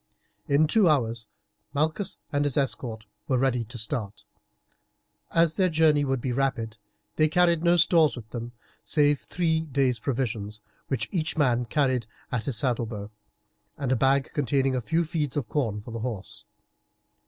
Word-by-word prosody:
In 145 +2 +4
two 190 +3 +4
hours 115 -6 +1 0.5
Malchus 160 +7 0 0.2
and 145 0 +2
his 145 -1 0
escort 115 -5 0 0.2
were 130 - +2
ready 125 -2 +1
to 120 +3 -9
start. 105 -2 -3 1.0
As 165 -1 +2
their 185 -2 +3
journey 155 -2 +4
would 135 -2 0
be 130 - -2
rapid 120 -4 -1 0.4
they 155 - +5
carried 170 0 +3
no 175 0 +4
stores 165 -2 +4
with 115 -4 -9
them, 120 0 -5 0.3
save 145 -2 +3
three 160 -2 -1
days' 130 -3 +1
provisions, 115 -6 -2 0.3
which 120 -5 -1
each 165 -2 -1
man 125 -5 +2
carried 130 -2 +1 0.2
at 115 -3 -1
his 130 -5 -1
saddlebow, 115 -4 -2 0.7
and 135 -3 -2
a - - +4
bag 135 +2 +2
containing 135 -1 +1
a 125 - 0
few 165 +7 0
feeds 150 -4 -2
of 135 -6 -2
corn 110 -8 -1
for 115 - -10
the 115 - -4
horse. 110 -2 -5
135 Hz, 160 wpm, -26 LUFS, 115-155 Hz, 1.0 s, they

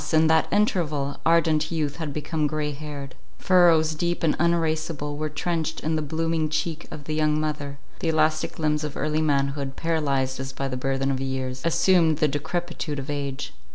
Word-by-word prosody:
in 160 0 +5
that 160 0 +3
interval 155 -9 +1
ardent 160 -2 +3
youth 150 -3 -1
had 160 -3 -3
become 150 +1 -1
grey 150 0 -2
haired; 145 -2 -7 0.2
furrows 170 -4 +4
deep 175 +3 -1
and 160 - +3
uneraseable 160 -3 0
were 155 +1 -2
trenched 160 +1 -2
in 160 +1 0
the 155 - 0
blooming 160 +1 -1
cheek 160 +1 -2
of 145 - -8
the 155 - -4
young 155 0 +2
mother; 145 -2 -3 0.2
the 165 - 0
elastic 155 0 +1
limbs 150 -1 0
of 150 -2 -4
early 155 +2 0
manhood, 140 -2 0
paralyzed 140 -6 0
as 135 0 -4
by 135 +1 -3
the 130 - -3
burthen 135 +1 0
of 135 -1 -2
years, 130 -1 -3
assumed 165 -1 +4
the 155 - +3
decrepitude 155 +1 -3
of 140 +2 -4
age. 140 -1 -4
155 Hz, 180 wpm, -25 LUFS, 140-160 Hz, 0.2 s, in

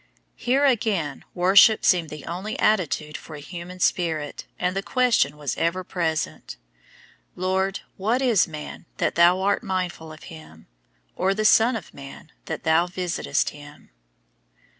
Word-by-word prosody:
Here, 265 +4 +1
again, 205 - 0
worship 195 +4 +5
seemed 170 -4 +3
the 150 -1 -9
only 190 +6 -5
attitude 160 -7 0
for 155 - -9
a - - -8
human 175 +4 -9
spirit, 160 -5 -1
and 180 +1 -1
the 195 - -1
question 240 - +1
was 145 -2 -3
ever 170 +3 0
present, 160 - -3 0.8
"Lord, 190 +1 -1 0.2
what 220 +6 0
is 245 -7 +3
man, 155 +1 -9
that - - 0
Thou 175 +2 +5
art 200 +1 +1
mindful 180 -4 -4
of 155 - -13
him; 80 - -14 0.5
or 195 +1 +1
the 215 +1 -1
son 225 +3 +5
of 210 -8 -7
man, 135 - -12
that - - -5
Thou 160 +2 +3
visitest 180 -5 -1
him?" 145 - -14
180 Hz, 145 wpm, -24 LUFS, 155-195 Hz, 0.8 s, worship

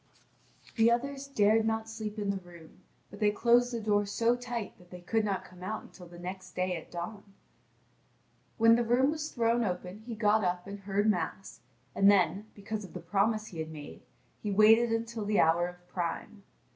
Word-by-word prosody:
The 225 0 +5
others 275 +4 -1
dared 220 -4 +3
not 220 0 -1
sleep 220 -1 -6
in 205 -1 0
the 200 - -2
room; 170 -1 -15 0.3
but - - -11
they 210 -1 +4
closed 240 +3 +3
the 235 - -2
door 205 -2 +1
so 230 +3 +2
tight 245 -4 -5
that 180 -1 -19
they 180 0 -10
could 220 +5 0
not 200 -2 -2
come 180 0 -15
out 215 +4 -4
until 180 -2 -13
the 175 0 -13
next 185 +1 -8
day 180 0 0
at 165 - -8
dawn. 175 +4 -6 1.4
When 230 0 +6
the 240 - +2
room 250 +4 +3
was 310 0 -4
thrown 235 0 +1
open 180 0 -4
he 235 - -4
got 215 0 +3
up 180 0 -1
and 200 0 -7
heard 200 +1 0
Mass, 185 - -2 0.3
and 195 0 +5
then, 195 +1 +3
because 210 +1 -5
of 190 - -11
the 180 - -5
promise 205 +5 0
he 165 - -8
had 160 0 -4
made, 150 -2 -10 0.4
he 210 - -3
waited 220 +3 +5
until 225 -1 -2
the 205 0 +1
hour 170 +2 +4
of 180 0 -12
prime. 180 +4 -4
205 Hz, 195 wpm, -30 LUFS, 180-225 Hz, 1.4 s, When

